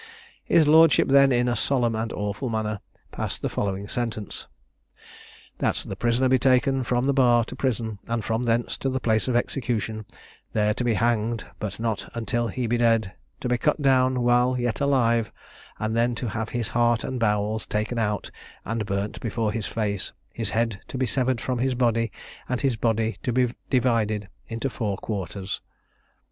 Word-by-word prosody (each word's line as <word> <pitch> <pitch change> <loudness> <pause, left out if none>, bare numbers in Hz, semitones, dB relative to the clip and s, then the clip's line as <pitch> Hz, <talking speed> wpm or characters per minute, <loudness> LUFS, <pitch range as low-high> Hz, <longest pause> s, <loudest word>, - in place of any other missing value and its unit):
His 160 - +5
lordship 160 0 +6
then, 140 0 +6
in 125 0 +2
a 120 - +1
solemn 120 0 +2
and 110 +1 -2
awful 105 +5 -3
manner, 110 -2 -2 0.3
passed - - -4
the - - 0
following 100 0 -2
sentence: 115 -2 -3 1.1
"That - - +1
the 95 - -4
prisoner 120 +5 +2
be 130 0 +4
taken 130 0 +3
from 125 +1 0
the 140 - +2
bar 120 -4 +4
to - - -8
prison, 115 -5 -2
and 115 -2 -2
from 115 +2 0
thence 115 0 0
to 135 - -1
the 130 0 -1
place 110 -2 +1
of 125 - +1
execution; 115 -4 -1 0.5
there 105 -1 +2
to 125 - -3
be 120 -2 +2
hanged, 115 -1 0
but 105 0 -4
not 110 -3 -2
until 115 0 -1
he 125 +1 -3
be 120 +1 +1
dead, 115 -4 +2 0.3
to - - -2
be 125 0 +1
cut 150 +3 +1
down 130 -2 +3
while 125 +1 +3
yet 120 +2 -1
alive, 115 -5 +2 0.5
and 110 +1 -2
then 120 +1 +2
to 120 0 -3
have 110 +1 -3
his 120 -4 -2
heart 120 -1 +2
and 130 -1 -3
bowels 105 0 0
taken 110 +3 -1
out 105 -2 -1 0.3
and 115 -2 -2
burnt 100 +1 -2
before 115 -1 -1
his 110 -1 -3
face; 100 -3 -2 0.2
his 115 -3 -2
head 115 -2 -1
to - - -6
be 130 - +1
severed 130 -1 0
from 125 +1 -2
his 130 +1 +1
body, 115 -3 +1 0.4
and 125 -2 -1
his 135 -4 +2
body 115 0 0
to 125 - -1
be 125 0 +2 0.2
divided 110 -5 +1 0.2
into 115 +3 -2
four 110 -6 -2
quarters." 100 -1 -4
115 Hz, 180 wpm, -25 LUFS, 110-125 Hz, 1.1 s, lordship